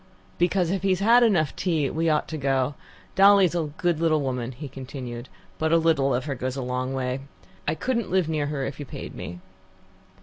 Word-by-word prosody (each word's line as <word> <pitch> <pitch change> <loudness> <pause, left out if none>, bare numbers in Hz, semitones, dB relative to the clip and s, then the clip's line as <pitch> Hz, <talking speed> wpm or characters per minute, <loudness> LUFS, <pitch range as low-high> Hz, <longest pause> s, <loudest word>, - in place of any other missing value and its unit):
"Because, 175 0 +2
if 195 -1 -1
he 195 - +1
has 185 -1 +2
had 230 +5 +6
enough 175 - +3
tea, 160 -6 0
we 165 +1 0
ought 150 -1 +1
to 160 - -4
go. 135 0 +1 0.4
Dolly's 195 -3 +6
a 165 -3 -1
good 175 -3 +1
little 160 -2 +3
woman," 125 -2 -2
he 140 +4 -8
continued, 130 -2 -7 0.3
"but 160 0 +1
a 165 - +6
little 160 -5 +2
of 125 +2 -2
her 145 - -2
goes 130 0 -3
a 135 - -3
long 125 +1 -2
way. 130 0 -2 0.5
I 155 - +1
couldn't 235 +1 -1
live 185 -2 +2
near 155 -2 -1
her 140 -2 -2
if 135 +1 -6
you 145 - -5
paid - - -7
me." 90 +1 -7
150 Hz, 210 wpm, -25 LUFS, 130-175 Hz, 0.5 s, had